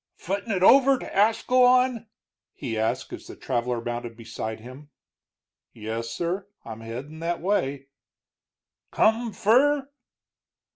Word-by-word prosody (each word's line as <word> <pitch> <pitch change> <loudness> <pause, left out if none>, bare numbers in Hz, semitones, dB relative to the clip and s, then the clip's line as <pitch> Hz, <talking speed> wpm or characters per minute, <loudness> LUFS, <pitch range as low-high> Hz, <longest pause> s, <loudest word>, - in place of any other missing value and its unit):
"Footin' 200 +5 -4
it 185 -2 0
over 270 +5 +6
to - - -9
Ascalon?" 250 +3 +3 0.5
he 120 -6 -5
asked, 110 0 -2
as - - -8
the - - -9
traveler 120 -1 -2
mounted 120 0 -5
beside 110 -1 -6
him. 130 +6 -12 0.8
"Yes 115 +1 -5
sir, 175 - -3 0.2
I'm 115 -1 -8
headin' 130 +8 -7
that 170 +1 -2
way." 140 -8 -1 1.1
"Come 225 +1 +2
fur?" 270 +7 +3
160 Hz, 115 wpm, -25 LUFS, -, 1.1 s, over